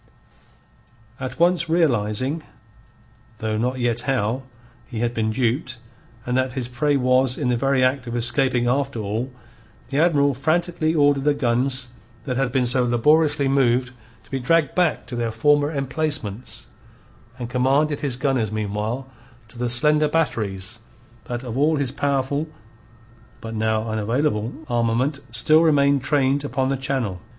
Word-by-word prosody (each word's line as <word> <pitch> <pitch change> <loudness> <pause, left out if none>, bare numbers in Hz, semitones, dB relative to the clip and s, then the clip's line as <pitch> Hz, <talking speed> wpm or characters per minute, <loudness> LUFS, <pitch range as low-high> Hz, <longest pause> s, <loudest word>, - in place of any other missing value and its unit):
At 130 +1 -6
once 170 -1 +3
realizing 135 -2 +1 1.0
though 110 0 -2
not 125 +4 -1
yet 120 -1 +1
how 125 -1 0 0.5
he 120 - -7
had 120 0 0
been 110 -2 0
duped, 125 +2 -1 0.5
and 125 - -1
that 130 0 0
his 130 -3 -3
prey 140 +4 +1
was 130 0 +2
in 135 -4 -1
the 125 - +2
very 135 +2 +2
act 130 -1 +1
of 120 - -4
escaping 120 +1 +1
after 135 +1 0
all, 110 +5 -3 0.6
the 140 +2 0
Admiral 145 -4 +3
frantically 160 +3 0
ordered 145 -2 +3
the 145 0 +2
guns 130 0 0 0.3
that 130 -3 -3
had 135 -1 0
been 125 0 +1
so 125 +1 +3
laboriously 145 +4 +3
moved 125 -2 +2 0.3
to - - -24
be 135 - -1
dragged 155 +3 +2
back 180 -3 +1
to 125 - -6
their 120 -1 -1
former 145 +6 +2
emplacements, 135 -5 -3 0.7
and 120 - -5
commanded 140 +4 +2
his 140 -4 -2
gunners 130 -5 0
meanwhile 110 +4 -3 0.4
to 120 - -13
the 120 0 0
slender 150 +5 +2
batteries 110 -9 -1 0.5
that 120 +1 -5
of 120 -3 -5
all 150 +4 +3
his 140 -4 -1
powerful, 140 +2 -1 0.9
but 115 0 -7
now 110 0 0
unavailable, 110 +2 0 0.2
armament 120 +4 0
still 120 +8 +4
remained 140 -3 +3
trained 140 0 +1
upon 135 -2 -1
the 135 - +1
channel. 130 -9 -2
130 Hz, 150 wpm, -22 LUFS, 120-145 Hz, 1.0 s, still